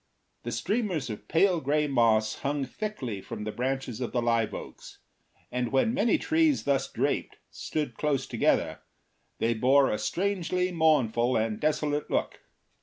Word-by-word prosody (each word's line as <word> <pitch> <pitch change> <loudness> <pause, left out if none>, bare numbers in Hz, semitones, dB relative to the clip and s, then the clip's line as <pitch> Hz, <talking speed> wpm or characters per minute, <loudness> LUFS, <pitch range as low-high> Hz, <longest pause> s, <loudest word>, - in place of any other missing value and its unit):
The 120 - -5
streamers 170 - -1
of 105 - -8
pale 175 +1 +3
gray 150 +2 +1
moss 115 -5 +2
hung 140 0 -1
thickly 130 - -5
from 105 - -7
the 110 - -3
branches 130 0 -3
of 125 - -3
the 125 - +1
live 115 -2 +1
oaks, - - -9 0.5
and 125 -1 -2
when 135 - +2
many 235 +9 +2
trees 315 -2 +2
thus 135 -1 0
draped - - -1
stood 150 -6 -3
close 140 +1 -1
together - - +1 0.6
they 115 +1 +1
bore 130 +4 +4
a 105 - -1
strangely 180 -1 -1
mournful 130 -8 +2
and 110 -1 -1
desolate 150 -1 0
look. - - -1
135 Hz, 150 wpm, -28 LUFS, 120-165 Hz, 0.6 s, bore